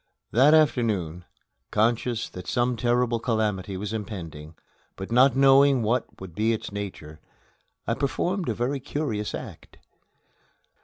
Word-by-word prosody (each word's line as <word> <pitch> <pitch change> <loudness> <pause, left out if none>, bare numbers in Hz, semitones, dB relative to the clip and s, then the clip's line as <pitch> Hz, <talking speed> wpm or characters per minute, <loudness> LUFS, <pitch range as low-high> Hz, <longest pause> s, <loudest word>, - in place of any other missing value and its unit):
That 140 +6 +6
afternoon, 105 - +1 0.4
conscious 115 +2 0
that 90 0 -10
some 120 0 +1
terrible 120 0 +1
calamity 105 -5 -1
was 105 +3 -4
impending, 85 -8 -7 0.4
but 95 +3 -8
not 125 +2 +5
knowing 135 -1 +5
what 120 +3 -1
would 95 -3 -9
be 110 +5 +1
its 110 - -5
nature, 90 -7 -7 0.7
I - - 0
performed 175 +5 -1
a - - +1
very 130 +5 -1
curious 130 -6 -3
act. - - -10
115 Hz, 125 wpm, -25 LUFS, 100-125 Hz, 0.7 s, That